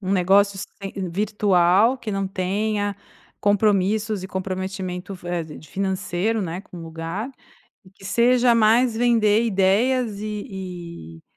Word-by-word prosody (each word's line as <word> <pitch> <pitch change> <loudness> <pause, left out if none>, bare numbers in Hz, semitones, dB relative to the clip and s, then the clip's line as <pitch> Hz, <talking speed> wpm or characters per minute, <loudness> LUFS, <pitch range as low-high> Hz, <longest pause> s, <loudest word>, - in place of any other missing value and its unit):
Um 190 -1 -2
negócio 195 +2 +3 0.2
sem 195 0 -6 0.2
virtual, 200 +3 +3
que 235 -3 -5
não 195 -1 -1
tenha 205 +2 -1 0.5
compromissos 205 0 +2
e 190 - -6
comprometimento 190 0 -4
f 180 -1 -12
eh, 175 -1 -2
de 155 -1 -12
financeiro, 195 +3 -1
né, 175 0 -4
com 195 - -14
o - - -8
lugar. 165 +8 -5 0.5
E 185 - -18
que 195 0 -18
seja 240 +4 +4
mais 230 +1 +4
vender 225 -2 +3
ideias, 215 +2 +1
e 185 - -7
e - - -22
195 Hz, 135 wpm, -23 LUFS, 185-215 Hz, 0.5 s, seja